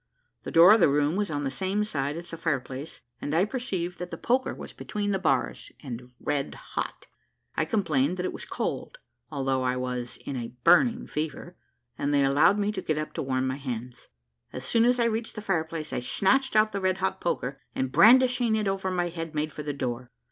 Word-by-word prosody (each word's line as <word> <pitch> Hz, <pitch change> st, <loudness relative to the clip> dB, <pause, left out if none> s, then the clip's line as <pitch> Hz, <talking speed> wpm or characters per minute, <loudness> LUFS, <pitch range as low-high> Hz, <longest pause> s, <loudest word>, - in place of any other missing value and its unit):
The -, -, -6 dB
door 170 Hz, +5 st, +9 dB
of 225 Hz, -, +5 dB
the 175 Hz, -, +5 dB
room 145 Hz, +3 st, +2 dB
was 205 Hz, 0 st, 0 dB
on 145 Hz, -2 st, -2 dB
the 135 Hz, -, -1 dB
same 195 Hz, +6 st, -1 dB
side 145 Hz, -6 st, -2 dB
as 170 Hz, +1 st, -9 dB
the -, -, -4 dB
fire 165 Hz, -4 st, 0 dB
place, 130 Hz, +4 st, -8 dB, 0.2 s
and 145 Hz, -, -2 dB
I 175 Hz, +4 st, +4 dB
perceived 195 Hz, -8 st, -3 dB
that 180 Hz, 0 st, -5 dB
the -, -, -6 dB
poker 255 Hz, +2 st, +1 dB
was -, -, -8 dB
between 205 Hz, -1 st, -3 dB
the 195 Hz, -, 0 dB
bars, 135 Hz, -8 st, 0 dB
and 125 Hz, -2 st, -7 dB
red 140 Hz, -1 st, -2 dB
hot. -, -, -5 dB, 0.5 s
I -, -, +1 dB
complained 165 Hz, -, +1 dB
that 180 Hz, -, -2 dB
it -, -, -2 dB
was -, -, -7 dB
cold, -, -, -4 dB, 0.3 s
although 135 Hz, -3 st, 0 dB
I 125 Hz, 0 st, 0 dB
was 125 Hz, -1 st, -3 dB
in 140 Hz, -, -4 dB
a 120 Hz, 0 st, -6 dB
burning 240 Hz, -4 st, +5 dB
fever; 155 Hz, +3 st, -4 dB, 0.4 s
and 140 Hz, -, 0 dB
they 140 Hz, -1 st, +4 dB
allowed 140 Hz, +8 st, +4 dB
me 205 Hz, 0 st, +1 dB
to 195 Hz, -3 st, -4 dB
get 155 Hz, -3 st, -1 dB
up 155 Hz, 0 st, -4 dB
to -, -, -3 dB
warm 130 Hz, -1 st, 0 dB
my 130 Hz, +1 st, -1 dB
hands. 125 Hz, -3 st, -6 dB, 0.4 s
As 125 Hz, -, -6 dB
soon 230 Hz, -, +3 dB
as 245 Hz, +1 st, +3 dB
I 235 Hz, -, +3 dB
reached 225 Hz, 0 st, -2 dB
the -, -, -4 dB
fire 190 Hz, -6 st, +1 dB
place, 160 Hz, -1 st, -6 dB
I -, -, 0 dB
snatched 235 Hz, -, +1 dB
out 215 Hz, 0 st, +5 dB
the 200 Hz, -, -3 dB
red 185 Hz, 0 st, +1 dB
hot 190 Hz, 0 st, -2 dB
poker; 135 Hz, -5 st, -2 dB
and 130 Hz, 0 st, -1 dB
brandishing 245 Hz, -, +6 dB
it 215 Hz, -2 st, 0 dB
over 195 Hz, -1 st, -1 dB
my 175 Hz, -1 st, 0 dB
head, 165 Hz, -2 st, -6 dB
made 155 Hz, +1 st, -1 dB
for -, -, -6 dB
the 150 Hz, 0 st, -3 dB
door. 125 Hz, -3 st, -4 dB
165 Hz, 225 wpm, -27 LUFS, 135-205 Hz, 0.5 s, door